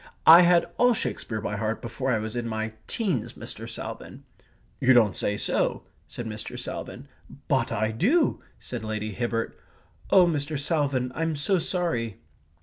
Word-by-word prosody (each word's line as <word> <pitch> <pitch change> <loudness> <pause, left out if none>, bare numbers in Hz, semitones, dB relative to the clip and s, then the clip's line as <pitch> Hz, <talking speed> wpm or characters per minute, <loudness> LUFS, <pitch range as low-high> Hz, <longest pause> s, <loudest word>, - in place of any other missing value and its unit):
I 165 +2 +11
had 175 -1 +5
all 245 -1 +5
Shakespeare 110 - -3
by 105 - -3
heart 110 +1 -2
before 125 +3 -4
I 120 - +3
was 110 +1 -4
in 120 -1 -2
my 110 0 -3
teens, 185 - -2
Mr. - - -8
Salvin!" - - -8 0.6
"You 130 0 +5
don't 110 -6 +4
say 105 - -1
so," - - 0 0.2
said 120 - -6
Mr. 110 -1 -6
Salvin. - - -6 0.4
"But - - +1
I 110 +1 0
do," 260 - +2 0.2
said 120 -3 -6
Lady 110 0 -3
Hibbert. 115 +1 -2 0.5
"Oh, 185 -2 +7
Mr. 150 -2 -1
Salvin, 140 -5 0
I'm 165 +1 -1
so 180 +6 +1
sorry...." 160 - -2
125 Hz, 155 wpm, -26 LUFS, 110-165 Hz, 0.6 s, I